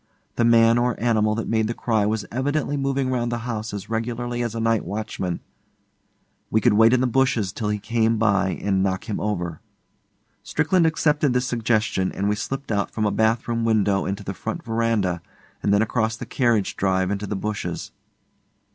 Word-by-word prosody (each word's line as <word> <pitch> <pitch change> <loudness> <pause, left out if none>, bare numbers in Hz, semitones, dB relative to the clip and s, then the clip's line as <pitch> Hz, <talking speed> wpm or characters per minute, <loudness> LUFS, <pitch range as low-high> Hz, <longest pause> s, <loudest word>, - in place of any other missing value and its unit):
The 120 - +1
man 115 0 +5
or 120 -1 0
animal 110 -2 +2
that 115 - -3
made 110 -1 +1
the 115 - -3
cry 110 -4 +1
was 110 -1 -1
evidently 145 +3 -1
moving 135 -1 0
round 120 -2 -1
the 120 - -1
house 110 -2 -3
as 100 0 -6
regularly 120 +2 -2
as 115 -2 -2
a - - -2
night 115 -1 +1
watchman. 100 -4 -4 1.1
We 110 - +3
could 120 -1 +3
wait 110 +2 +6
in 125 - +3
the - - +2
bushes 120 -6 +1
till 110 -3 -2
he 105 - 0
came 115 +2 +1
by 100 -3 +2
and 95 -2 +1
knock 95 -1 -1
him 105 - -2
over. 90 -6 -3 0.8
Strickland 180 -3 +2
accepted 150 -3 +2
this 125 0 +1
suggestion, 110 -5 0
and 100 - -1
we 105 - +2
slipped 135 +4 -4
out 100 -2 0
from 110 - -2
a 105 - +2
bath 110 +2 +1
room 115 -1 -1
window 105 -3 +2
into 100 +1 -3
the 95 - -4
front 110 +4 -5
verandah 115 -6 0 0.4
and 100 - +1
then 100 +2 +4
across 115 0 -1
the 125 - -6
carriage 115 -4 +1
drive 95 -1 +1
into 100 0 -3
the 105 - -2
bushes. 105 +2 -4
110 Hz, 190 wpm, -23 LUFS, 105-120 Hz, 1.1 s, wait